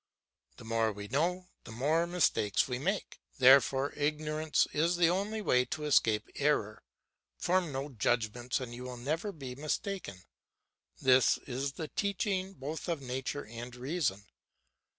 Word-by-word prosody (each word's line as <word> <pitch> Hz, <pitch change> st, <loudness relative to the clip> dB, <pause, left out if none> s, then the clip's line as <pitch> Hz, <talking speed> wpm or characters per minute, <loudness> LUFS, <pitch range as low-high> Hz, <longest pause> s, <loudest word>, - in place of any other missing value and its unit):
The -, -, -12 dB
more 115 Hz, -1 st, +1 dB
we 105 Hz, 0 st, -7 dB
know, 180 Hz, +7 st, 0 dB
the -, -, -10 dB
more 150 Hz, +9 st, +1 dB
mistakes 170 Hz, -, +2 dB
we 125 Hz, -2 st, -3 dB
make; 195 Hz, +8 st, -2 dB, 0.2 s
therefore 135 Hz, +1 st, +5 dB
ignorance 155 Hz, +1 st, 0 dB
is 165 Hz, +4 st, +2 dB
the 175 Hz, -1 st, +4 dB
only 210 Hz, +4 st, -2 dB
way 125 Hz, -9 st, +4 dB
to 155 Hz, +2 st, -5 dB
escape 115 Hz, -7 st, +3 dB
error. 140 Hz, -8 st, +1 dB, 0.6 s
Form 180 Hz, -3 st, +1 dB
no 135 Hz, +2 st, -3 dB
judgments 120 Hz, +1 st, 0 dB
and 125 Hz, -2 st, -6 dB
you 120 Hz, -, -8 dB
will 125 Hz, -1 st, -6 dB
never 155 Hz, -, -2 dB
be 135 Hz, -8 st, -7 dB
mistaken. 150 Hz, -, -4 dB, 0.8 s
This 130 Hz, -2 st, +5 dB
is 135 Hz, +2 st, -3 dB
the 155 Hz, 0 st, -6 dB
teaching 195 Hz, -1 st, -1 dB
both 155 Hz, +1 st, -6 dB
of 165 Hz, -3 st, 0 dB
nature 135 Hz, +2 st, -4 dB
and 120 Hz, +2 st, -8 dB
reason. 125 Hz, -, -2 dB
140 Hz, 145 wpm, -31 LUFS, 125-165 Hz, 0.8 s, therefore